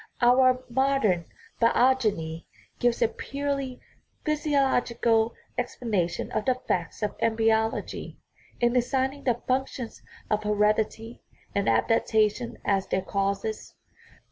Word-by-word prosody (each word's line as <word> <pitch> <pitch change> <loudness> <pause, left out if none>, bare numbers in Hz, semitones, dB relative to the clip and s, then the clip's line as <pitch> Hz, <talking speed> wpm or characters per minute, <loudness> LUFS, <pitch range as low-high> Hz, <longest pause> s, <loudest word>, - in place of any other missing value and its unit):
Our 255 +1 +4
modern 240 -9 +1 0.4
biogeny 225 -10 +2 0.3
gives 240 0 +2
a - - +5
purely 275 0 -4 0.5
physiological 255 -7 +1 0.2
ex 245 - -3
planation 200 -8 -1
of 215 - 0
the 255 - +3
facts 180 -6 -3
of 210 - -1
embryology, 225 0 0 0.4
in 240 0 +2
assigning 265 +3 0
the 240 -2 0
functions 255 -2 -2 0.3
of 210 0 0
heredity 215 +2 0 0.3
and 200 - +1
adaptation 215 - +1
as 195 -1 +1
their 190 - 0
causes. 200 +2 -2
230 Hz, 105 wpm, -27 LUFS, 210-255 Hz, 0.5 s, a